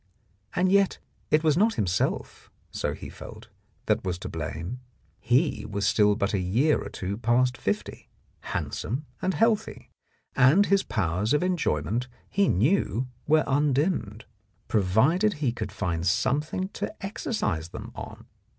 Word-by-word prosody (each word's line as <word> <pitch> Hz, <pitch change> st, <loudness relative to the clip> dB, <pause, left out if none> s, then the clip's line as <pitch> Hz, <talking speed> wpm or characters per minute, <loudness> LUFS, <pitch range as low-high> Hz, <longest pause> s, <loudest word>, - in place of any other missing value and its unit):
And 185 Hz, +1 st, +2 dB
yet 200 Hz, -1 st, +3 dB, 0.3 s
it 155 Hz, +1 st, +3 dB
was 155 Hz, -2 st, +4 dB
not 215 Hz, +6 st, +3 dB
himself, 90 Hz, -3 st, -1 dB, 0.2 s
so -, -, -2 dB
he -, -, -9 dB
felt, -, -, -11 dB, 0.4 s
that -, -, +1 dB
was 90 Hz, -2 st, -2 dB
to -, -, -7 dB
blame. 90 Hz, -, -5 dB, 0.4 s
He 125 Hz, -1 st, +1 dB
was 100 Hz, -1 st, -2 dB
still 105 Hz, 0 st, +4 dB
but 100 Hz, +1 st, -1 dB
a 100 Hz, -, +1 dB
year 115 Hz, +12 st, +2 dB
or -, -, -6 dB
two 95 Hz, +2 st, -4 dB
past 120 Hz, +2 st, +2 dB
fifty, 105 Hz, -1 st, -3 dB, 0.3 s
handsome 130 Hz, +8 st, -3 dB, 0.2 s
and 185 Hz, 0 st, 0 dB
healthy, 225 Hz, -2 st, 0 dB, 0.4 s
and 140 Hz, +10 st, +6 dB
his 200 Hz, -1 st, +3 dB
powers 100 Hz, -, -1 dB
of 150 Hz, -, +1 dB
enjoyment 125 Hz, -, 0 dB, 0.2 s
he 200 Hz, -1 st, +3 dB
knew 130 Hz, -, +1 dB, 0.2 s
were 155 Hz, +1 st, +4 dB
undimmed, 140 Hz, -, 0 dB, 0.4 s
pro 110 Hz, -, +2 dB
vided 155 Hz, -, +3 dB
only -, -, -13 dB
he 140 Hz, -5 st, 0 dB
could 110 Hz, -4 st, -5 dB
find 85 Hz, -1 st, -2 dB
something 150 Hz, -, 0 dB
to -, -, -4 dB
exercise 195 Hz, -, -2 dB
them -, -, -8 dB
on. -, -, -9 dB
125 Hz, 150 wpm, -26 LUFS, 100-165 Hz, 0.4 s, and